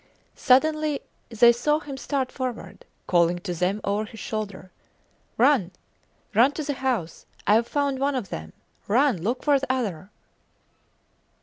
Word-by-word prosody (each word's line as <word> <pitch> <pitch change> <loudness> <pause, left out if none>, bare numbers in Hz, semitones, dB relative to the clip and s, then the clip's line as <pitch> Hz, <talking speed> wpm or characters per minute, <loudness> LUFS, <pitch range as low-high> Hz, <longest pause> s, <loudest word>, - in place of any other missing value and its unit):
Suddenly 305 +2 +2 0.3
they 235 +1 +6
saw 275 +6 +1
him 285 -3 -8
start 265 -1 -2
forward, 255 - -6 0.2
calling 175 0 +3
to 180 0 -5
them 180 +4 0
over 205 +2 -1
his 220 +1 -12
shoulder: 200 -4 -5 0.7
Run! 250 -8 +4 0.6
Run 245 +7 +5
to 310 - -4
the 290 0 -2
house! 250 -11 -3 0.2
Ive 225 +3 +3
found 280 -1 -1
one 280 +1 0
of 230 -8 -3
them. 80 0 -7 0.3
Run, 245 - +2
look 235 +8 -2
for 290 -2 +4
the 270 -1 -2
other! 200 -9 -3
245 Hz, 140 wpm, -25 LUFS, 200-275 Hz, 0.7 s, they